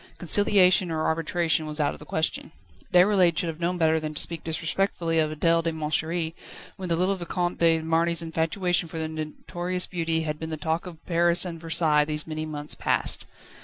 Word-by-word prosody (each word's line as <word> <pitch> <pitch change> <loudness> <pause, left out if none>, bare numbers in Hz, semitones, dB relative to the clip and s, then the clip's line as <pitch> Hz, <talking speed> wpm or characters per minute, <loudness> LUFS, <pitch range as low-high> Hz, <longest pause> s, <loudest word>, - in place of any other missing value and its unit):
Conciliation 185 0 +4
or 160 -1 -2
arbitration 160 0 0
was 150 0 -3
out 145 -1 +1
of - - -12
the 150 - -12
question. 160 0 -1 0.4
Déroulède 180 -2 +4
should 175 -3 0
have 160 0 -7
known 175 +1 -1
better 160 -1 +2
than 155 -1 -5
to - - 0
speak 165 -2 -1
disrespectfully 165 +1 -1
of 155 -1 +2
Adèle 165 +2 +2
de 165 0 -1
Montchéri, 160 +1 -2 0.4
when 185 -2 -6
the 165 - +2
little 185 +3 +1
Vicomte 175 0 -3
de 165 -1 +4
Marny's 165 +1 +1
infatuation 165 +2 -1
for 165 - -7
the 160 0 -2
notorious 175 +3 -4
beauty 165 -2 -1
had 150 -1 -4
been 160 - -5
the 155 - -4
talk 160 +4 -2
of 165 -3 -12
Paris 170 +1 +3
and 165 -2 -6
Versailles 160 -2 +2
these 150 0 -3
many 155 0 -5
months 150 -1 -3
past. - - 0
165 Hz, 195 wpm, -25 LUFS, 155-175 Hz, 0.4 s, Conciliation